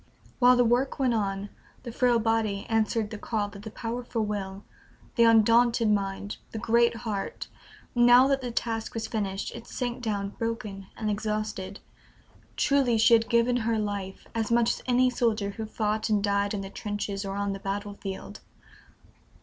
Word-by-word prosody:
While 250 0 +7
the 245 - +4
work 245 +4 +1
went 260 -3 +2
on, 200 -2 -2 0.3
the 240 - -6
frail 245 0 +3
body 225 -3 0
answered 220 -1 0
the 215 - -6
call 205 -2 -2
of 200 - -10
the 220 - -7
powerful 230 0 -3
will, 200 -1 -4 0.5
the 235 - +5
undaunted 230 0 +5
mind, 200 0 -2 0.2
the - - -4
great 235 +1 +3
heart; 220 -4 -4 0.4
now 245 +2 +6
that 275 -1 +1
the 250 - -4
task 225 -1 -3
was 225 -1 -2
finished, 200 -3 -3
it 235 0 -9
sank 245 -1 -4
down 205 -4 -2
broken 210 -3 -5
and 215 -1 -1
exhausted. 210 -2 -3 0.8
Truly, 270 -5 +3
she 225 +2 +5
had 225 0 +4
given 235 +1 +3
her 230 -1 0
life, 200 -2 -4
as 225 -1 -1
much 235 0 +4
as - - -5
any 250 0 +3
soldier 220 -4 0
who 220 +2 -6
fought 215 0 -1
and 210 -2 +2
died 200 0 +1
in 200 - -3
the 195 0 -7
trenches 205 -1 -4
or 195 0 -4
on 200 0 -1
the 195 - -6
battlefield. 195 - -5
220 Hz, 170 wpm, -27 LUFS, 200-235 Hz, 0.8 s, While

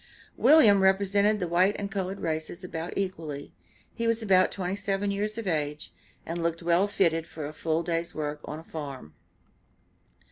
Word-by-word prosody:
William 225 -11 +6
represented 200 +2 +3
the 180 - -1
white 180 +4 +3
and 200 -1 -4
colored 195 0 -3
races 160 +3 -3
about 170 -1 -5
equally; 160 -7 -4 0.4
he 230 - -2
was 230 0 +1
about 185 -3 +4
twenty 185 0 -2
seven 200 0 -1
years 210 +2 -2
of 230 - -4
age, 150 -4 -2 0.3
and 170 +1 -4
looked 170 0 -2
well 175 +4 +3
fitted 165 -5 +1
for 155 -2 -7
a 150 - -6
full 160 +1 -1
day's 170 0 -2
work 150 -1 -3
on 150 - -6
a 160 - -10
farm. 140 - -7
180 Hz, 170 wpm, -27 LUFS, 160-200 Hz, 0.4 s, William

